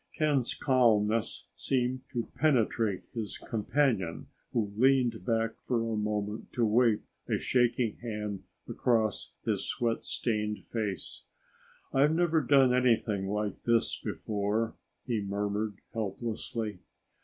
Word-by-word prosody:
Ken's 145 -5 +2
calmness 115 -4 +2
seemed 130 0 0
to 120 -2 -3
penetrate 115 -8 +2
his 110 -3 -4
companion 110 - 0 0.2
who 105 -4 -1
leaned 125 -1 +3
back 115 -1 0
for 120 -2 0
a 115 -1 -1
moment 105 0 -2
to 120 - +2
wipe 115 0 +3 0.3
a - - +2
shaking 120 -3 +1
hand 105 -4 -4 0.3
across 110 -4 0
his - - -1
sweat 115 -1 -1
stained 105 -2 -2
face. 105 -5 -4 0.7
"I've 145 +4 +4
never 165 -2 +3
done 135 -2 +5
anything 115 -6 +2
like 105 0 -2
this 115 -1 +2
before," 105 +2 -2 0.3
he 115 -4 0
murmured 100 +1 -2 0.2
helplessly. 110 -1 -3
115 Hz, 115 wpm, -30 LUFS, 105-125 Hz, 0.7 s, done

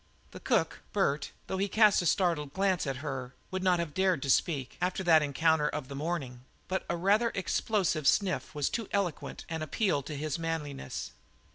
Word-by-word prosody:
The - - -9
cook, - - 0
Bert, 150 -8 +1 0.2
though 190 - -3
he 200 - +1
cast 210 -1 +5
a 175 - 0
startled 160 -6 +1
glance 190 -4 +1
at 135 - -1
her 130 -3 -4 0.2
would 185 0 -2
not 185 -1 +3
have 170 -3 -3
dared 185 -5 +2
to 140 - +2
speak, 140 -5 +1
after 185 +1 0
that 165 -3 +6
encounter 150 +1 +2
of 150 -4 -5
the 140 - -6
morning, 140 -5 -3 0.2
but 190 0 -1
a 170 - 0
rather 210 +6 +3
explosive 185 -5 0
sniff 190 -5 +1
was 145 -2 +1
too 230 -3 -3
eloquent 195 -6 -2
an 160 -1 -4
appeal 165 0 0
to 145 +2 -6
his 155 +2 -2
manliness. 150 - -4
165 Hz, 185 wpm, -30 LUFS, 145-190 Hz, 0.2 s, that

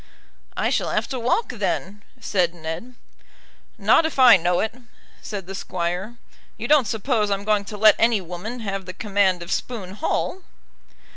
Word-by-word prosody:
"I - - +1
shall - - 0
have - - -1
to 260 - -3
walk, 250 - 0
then," 205 -3 -3 0.2
said 180 -7 0
Ned. 165 +10 -6 0.8
"Not - - +4
if 320 -2 -3
I 255 -6 +9
know 175 0 +1
it," 220 - -1 0.5
said 200 -4 -6
the 190 - -7
Squire. 185 +4 -3 0.4
"You - - -4
don't 290 -6 +4
suppose 220 0 0
I'm 200 0 -1
going 210 -1 +1
to 210 +1 -7
let 215 +1 +6
any 230 -2 +3
woman 185 +7 -7
have 195 -3 -4
the 185 - -6
command 195 -3 +1
of 170 - -8
Spoon 200 -7 -3
Hall?" 325 - -2
205 Hz, 165 wpm, -23 LUFS, 185-235 Hz, 0.8 s, I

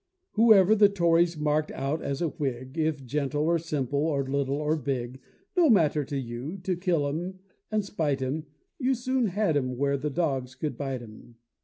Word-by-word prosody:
Whoever 215 -3 +6
the 205 -2 +6
Tories 170 -3 +2
mark'd 150 0 0
out 140 +4 -2
as 140 +4 -2
a 165 - +1
Whig, 130 -4 -4
If 155 -4 -1
gentle, 145 +2 -1
or 170 +1 +2
simple, 145 -4 -2
or 145 -2 +1
little, 140 0 -1
or 150 +1 0
big, 130 -4 -3 0.3
No 345 -4 +5
matter 155 - +4
to 140 - -4
you 130 +7 -5
to 185 -1 0
kill 170 -5 0
'em 175 +6 -4 0.3
and 215 -2 0
spite 155 -8 -1
'em, 150 +4 -3 0.3
You 260 0 +2
soon 255 0 0
had 195 -3 0
'em 130 -3 +1
up - - -8
where 140 +1 +1
the 150 +2 -2
dogs 135 -5 -1
couldn't 150 +3 -4
bite 135 -3 -3
'em. 115 +1 -14
150 Hz, 190 wpm, -27 LUFS, 135-175 Hz, 0.3 s, Whoever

